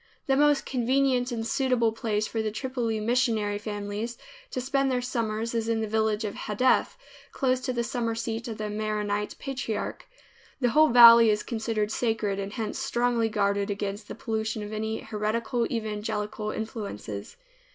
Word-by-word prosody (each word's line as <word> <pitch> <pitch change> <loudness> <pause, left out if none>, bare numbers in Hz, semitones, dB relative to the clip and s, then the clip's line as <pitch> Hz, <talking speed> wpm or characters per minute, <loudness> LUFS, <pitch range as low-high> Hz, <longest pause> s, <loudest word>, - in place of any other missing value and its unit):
The 270 -3 +2
most 290 0 +3
convenient 255 0 +1
and 225 -2 -3
suitable 245 -2 +2
place 215 -1 -1
for 225 - -2
Tripoli 230 -1 -2
missionary 220 -3 +1
families 210 +2 -4 0.3
to - - -3
spend 270 +2 +1
their 255 -1 +1
summers 230 -2 -2
is 230 -1 -1
in 225 -1 +1
the 220 - -1
village 220 0 0
of 205 - -3
Hadeth 250 - +1 0.3
close 255 -1 +1
to 255 0 -2
the 240 -1 -1
summer 230 -1 -2
seat 230 0 -3
of 225 -2 -5
the 215 - -3
Maronite 210 -1 -2
patriarch. 255 -6 -4 0.5
The 250 -3 +2
whole 310 +5 +5
valley 235 -1 +9
is 210 0 +1
considered 220 -2 -2
sacred, 215 -5 0
and 195 0 -4
hence 225 0 -3
strongly 240 -3 +1
guarded 200 -1 0
against 205 +1 -3
the - - -7
pollution 220 -2 -2
of 210 +1 -7
any 220 +1 -2
heretical 230 +2 -1
evangelical 215 -1 -3
influences. 205 - -5
225 Hz, 160 wpm, -27 LUFS, 210-245 Hz, 0.5 s, valley